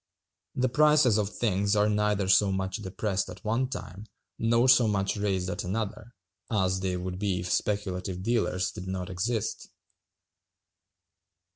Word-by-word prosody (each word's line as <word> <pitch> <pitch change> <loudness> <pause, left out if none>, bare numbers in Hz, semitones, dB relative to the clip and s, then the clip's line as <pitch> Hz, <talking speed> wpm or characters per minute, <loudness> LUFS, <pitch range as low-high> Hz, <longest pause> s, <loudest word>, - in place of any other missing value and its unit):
The 130 0 +2
prices 150 -4 +4
of 100 -1 0
things 100 -1 0
are 105 0 +3
neither 105 -2 +1
so 95 +1 +4
much 95 0 -2
depressed 100 -1 -2
at 90 +1 -10
one 120 +4 0
time, 105 -5 -7 0.3
nor 115 +2 +3
so 125 -2 +6
much 100 -2 0
raised 95 -3 -1
at 90 - -3
another, 110 +4 -4 0.3
as 95 -4 +1
they 95 -1 -1
would 90 0 -5
be 95 -3 -1
if 90 - -4
speculative 95 -2 -2
dealers 110 -5 0
did 90 - -8
not 95 -1 -4
exist. 105 +4 -2
100 Hz, 145 wpm, -28 LUFS, 95-110 Hz, 0.3 s, so